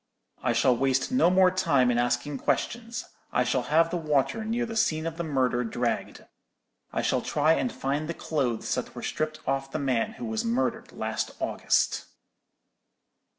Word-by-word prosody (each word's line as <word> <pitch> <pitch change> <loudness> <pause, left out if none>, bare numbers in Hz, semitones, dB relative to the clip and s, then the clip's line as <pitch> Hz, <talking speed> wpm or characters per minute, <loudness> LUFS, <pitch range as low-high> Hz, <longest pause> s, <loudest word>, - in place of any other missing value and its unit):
"'I - - +1
shall 125 - +4
waste 135 +1 +1
no 255 -9 +4
more 185 0 +5
time 140 -9 +3
in 120 - +1
asking 120 +3 0
questions. 235 +1 -2 0.3
I 125 - +2
shall 125 +1 +1
have 165 +2 +4
the 180 - 0
water 155 - +1
near 230 +2 -1
the 225 -1 -6
scene 160 -7 +1
of 165 -1 -3
the 170 - -2
murder 130 -5 +1
dragged. 120 +1 -2 0.7
I - - -1
shall - - +1
try 150 +2 +2
and 245 +8 0
find 145 +1 -2
the 170 - -2
clothes 130 -7 -1
that - - -4
were - - -7
stripped 155 0 -2
off 135 0 0
the - - -2
man 135 - 0
who 240 +1 -7
was 220 0 -2
murdered 235 +3 -1
last - - -3
August!'" - - +1
CHAPTER - - -16
XXXIX. - - -29
155 Hz, 185 wpm, -27 LUFS, 130-190 Hz, 0.7 s, more